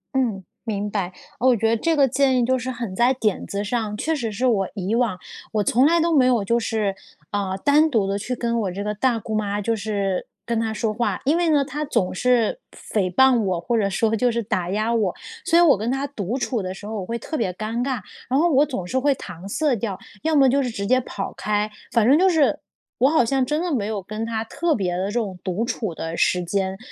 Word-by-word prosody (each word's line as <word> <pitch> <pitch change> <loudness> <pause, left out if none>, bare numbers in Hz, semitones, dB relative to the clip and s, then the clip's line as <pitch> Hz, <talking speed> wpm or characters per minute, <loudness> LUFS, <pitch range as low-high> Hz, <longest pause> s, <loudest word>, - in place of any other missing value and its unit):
嗯， 225 -8 0 0.2
明 210 -2 -2
白。 190 -3 -2 0.3
我 250 +1 +4
觉 225 +1 +1
得 230 - +3
这 325 +8 +1
个 280 -2 +4
建 265 0 +2
议 240 - +2
就 260 +1 +2
是 255 +1 -4
很 235 -6 -5
在 240 +5 +4
点 220 -6 -1
子 200 +1 -3
上， 210 -1 -2
确 320 +8 0
实 235 -7 -3
是 240 +6 -2
我 205 -6 +2
以 195 +2 -2
往 235 -6 +1 0.4
我 210 -1 +2
从 245 +6 +3
来 340 +1 +4
都 330 0 +2
没 265 -3 +5
有 245 -5 +3
就 235 +4 +1
是， 215 -4 -1 0.4
呃， 195 -2 -1
单 300 +2 +5
独 220 -7 +1
地 195 +1 -1
去 250 +5 -3
跟 235 -1 -1
我 195 -3 -2
这 195 +3 -4
个 210 0 -2
大 240 +2 +1
姑 220 +1 -6
妈 205 -1 -1
就 225 +3 0
是 200 -3 -2 0.2
跟 235 -1 0
她 225 -1 -1
说 220 0 -1
话。 235 +2 -1
因 290 +4 +3
为 345 -1 +2
呢， 290 -3 +3
她 295 +2 -4
总 205 -10 0
是 250 - +2 0.3
诽 190 -4 +1
谤 265 +3 +5
我， 185 -4 0
或 235 +8 -1
者 200 -2 +1
说 225 +3 +1
就 245 +2 +2
是 235 0 -1
打 185 -5 -2
压 215 +4 0
我， 210 -5 +1 0.3
所 345 -2 +4
以 - - +7
我 330 -5 +6
跟 220 +4 -2
她 270 +2 -1
独 230 -4 -3
处 240 -2 -1
的 185 -1 -4
时 205 - -11
候， 215 0 -4
我 - - -5
会 235 +3 -3
特 315 - -6
别 210 -10 0
尴 220 +5 -3
尬。 260 -2 -1 0.3
然 265 +3 +2
后 345 - +4
我 285 +2 +5
总 250 -11 -4
是 255 +8 0
会 280 +1 +2
搪 180 -5 -9
塞 285 +6 +1
掉， 200 -3 -3 0.2
要 320 0 +1
么 275 -2 +6
就 275 +2 +3
是 255 - -1
直 200 -3 -4
接 255 +4 +3
跑 200 -4 -5
开， 210 +1 -1 0.2
反 230 -2 +3
正 280 +4 +6
就 375 +1 +5
是， 315 -5 +2 0.4
我 265 - +5
好 295 -6 +3
像 265 +2 +1
真 300 +5 -1
的 350 -2 -1
没 220 -7 0
有 215 -2 -3
跟 215 +3 -5
她 225 -1 -2
特 320 +7 0
别 180 -4 -1
的 185 +2 -1
这 - - -4
种 210 -6 -2
独 190 +5 -1
处 225 -7 -3
的 165 +1 -4
时 180 +1 +2
间。 190 +1 -1
230 Hz, 270 characters per minute, -23 LUFS, 200-260 Hz, 0.4 s, 以